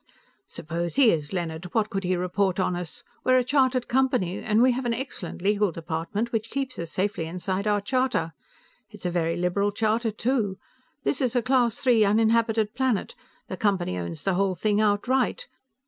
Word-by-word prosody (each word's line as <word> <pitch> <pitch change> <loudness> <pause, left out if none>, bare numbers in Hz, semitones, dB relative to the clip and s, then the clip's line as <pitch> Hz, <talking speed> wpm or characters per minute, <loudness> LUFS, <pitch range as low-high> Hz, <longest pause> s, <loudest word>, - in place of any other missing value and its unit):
"Suppose 170 +2 -4
he 260 -5 +6
is, 150 -3 -2
Leonard. 170 -2 -3
What 215 -1 +1
could 195 -2 -2
he 185 0 +1
report 180 +1 0
on 185 -1 +1
us? 175 -2 -6 0.2
We 255 - +3
are - - +6
a 255 - +3
chartered 260 -1 +2
company, 250 -8 +1
and 215 0 +1
we 255 +2 +5
have 250 +1 -3
an 235 - 0
excellent 230 -9 -6
legal 205 -1 +2
department, 170 +8 -3
which 225 0 -2
keeps 270 -2 -3
us 170 -1 -5
safely 190 -4 -1
inside 185 +4 -3
our 205 -1 +2
charter. 250 -8 0 0.6
It 210 - -14
is - - -9
a 180 - 0
very 165 -1 0
liberal 180 +4 +1
charter, 225 +2 0
too. 220 -3 -1 0.5
This 275 - 0
is 255 -2 0
a 245 - +2
Class 245 -1 +1
III 235 -4 +5
uninhabited 220 0 +2
planet; 260 -6 0 0.3
the - - -5
Company 195 - 0
owns 85 -2 -5
the 195 - +1
whole 190 0 +1
thing 210 +3 +1
outright. 225 +5 +1
205 Hz, 190 wpm, -26 LUFS, 180-240 Hz, 0.6 s, he